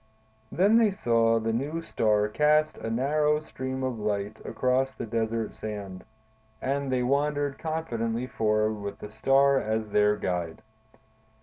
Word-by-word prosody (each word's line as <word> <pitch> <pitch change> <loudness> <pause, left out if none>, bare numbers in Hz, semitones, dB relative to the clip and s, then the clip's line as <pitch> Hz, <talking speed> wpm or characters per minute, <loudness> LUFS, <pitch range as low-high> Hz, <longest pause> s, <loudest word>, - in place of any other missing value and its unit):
Then 205 +6 +4
they 225 -2 +4
saw 115 - +2
the 110 0 -1
new 145 +8 -2
star 105 -7 +1
cast 150 +6 +2
a 115 - -4
narrow 150 +5 +1
stream 130 -3 -5
of 130 -3 -2
light 105 0 -3
across 130 +1 0
the - - -5
desert 115 0 -2
sand, 100 -4 -7 0.6
and 140 +1 -2
they 125 -1 +1
wandered 145 +1 0
confidently 120 -8 -2
forward 110 -3 0
with 100 0 -5
the 105 - -9
star 135 +3 +3
as 110 -1 -2
their 105 0 +3
guide. 90 -3 -3
115 Hz, 140 wpm, -27 LUFS, 110-140 Hz, 0.6 s, Then